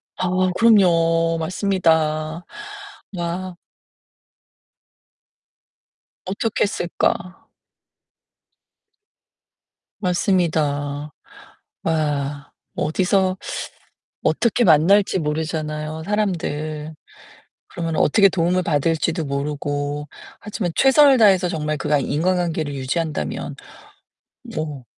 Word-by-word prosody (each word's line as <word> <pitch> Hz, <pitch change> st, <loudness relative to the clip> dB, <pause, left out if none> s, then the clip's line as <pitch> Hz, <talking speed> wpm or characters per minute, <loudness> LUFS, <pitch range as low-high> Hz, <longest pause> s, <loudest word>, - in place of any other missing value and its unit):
아, 185 Hz, -, -1 dB, 0.3 s
그럼요. 165 Hz, -6 st, +4 dB
맞습니다. 160 Hz, -3 st, 0 dB, 0.7 s
와. 175 Hz, +1 st, -4 dB, 2.7 s
어떻게 200 Hz, +4 st, -1 dB
했을까. 180 Hz, -1 st, -2 dB, 2.5 s
맞습니다. 155 Hz, -7 st, 0 dB, 0.7 s
와, 145 Hz, -3 st, -2 dB, 0.2 s
어디서 185 Hz, +3 st, +1 dB, 0.9 s
어떻게 235 Hz, +1 st, +2 dB
만날지 185 Hz, +4 st, +4 dB
모르잖아요, 155 Hz, 0 st, -3 dB
사람들. 155 Hz, -7 st, -2 dB, 0.7 s
그러면 165 Hz, -2 st, -4 dB
어떻게 195 Hz, +6 st, +5 dB
도움을 180 Hz, 0 st, +1 dB
받을지도 165 Hz, +1 st, 0 dB
모르고. 145 Hz, +1 st, -3 dB, 0.5 s
하지만 180 Hz, -6 st, -1 dB
'최선을 270 Hz, -1 st, +6 dB
다해서 190 Hz, -4 st, +5 dB
정말 155 Hz, -3 st, -2 dB
그 135 Hz, -, -5 dB
과 150 Hz, -1 st, +3 dB
인과관계를 160 Hz, 0 st, -1 dB
유지한다면 140 Hz, -, -3 dB, 1.0 s
뭐 150 Hz, -4 st, -4 dB
165 Hz, 185 characters per minute, -21 LUFS, 150-185 Hz, 2.7 s, 최선을